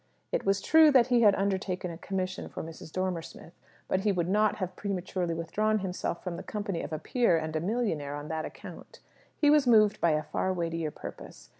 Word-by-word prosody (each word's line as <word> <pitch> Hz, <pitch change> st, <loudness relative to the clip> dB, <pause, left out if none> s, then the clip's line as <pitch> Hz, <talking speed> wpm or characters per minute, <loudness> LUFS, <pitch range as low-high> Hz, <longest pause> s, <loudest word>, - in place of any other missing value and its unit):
It -, -, -1 dB
was 195 Hz, 0 st, +2 dB
true 320 Hz, -1 st, +7 dB
that 255 Hz, -4 st, +5 dB
he 245 Hz, -1 st, +4 dB
had 205 Hz, -3 st, +6 dB
undertaken 190 Hz, -2 st, -1 dB
a 165 Hz, -, -8 dB
commission 185 Hz, -1 st, -3 dB
for -, -, -6 dB
Mrs. 160 Hz, 0 st, -10 dB
Dormer 185 Hz, -2 st, -1 dB
Smith; 165 Hz, -, -12 dB, 0.3 s
but 190 Hz, -, +1 dB
he 205 Hz, +1 st, +1 dB
would 175 Hz, -3 st, 0 dB
not 210 Hz, +2 st, +2 dB
have 185 Hz, -2 st, -4 dB
prematurely 185 Hz, -3 st, -3 dB
withdrawn 215 Hz, +7 st, 0 dB
himself 185 Hz, -3 st, -3 dB
from 180 Hz, -2 st, -4 dB
the -, -, -6 dB
company 205 Hz, -5 st, -4 dB
of -, -, -6 dB
a 155 Hz, -, -2 dB
peer 230 Hz, -, +2 dB
and 160 Hz, 0 st, -4 dB
a -, -, +1 dB
millionaire, 175 Hz, -8 st, -1 dB
on 145 Hz, +1 st, -6 dB
that 160 Hz, 0 st, -3 dB
account. -, -, -10 dB, 0.4 s
He 295 Hz, -1 st, +4 dB
was 295 Hz, -3 st, +4 dB
moved 215 Hz, -3 st, +5 dB
by 170 Hz, -2 st, +4 dB
a 155 Hz, 0 st, 0 dB
far 190 Hz, -, -1 dB
weightier 165 Hz, -3 st, -2 dB
purpose. -, -, -10 dB
185 Hz, 210 wpm, -29 LUFS, 165-210 Hz, 0.4 s, true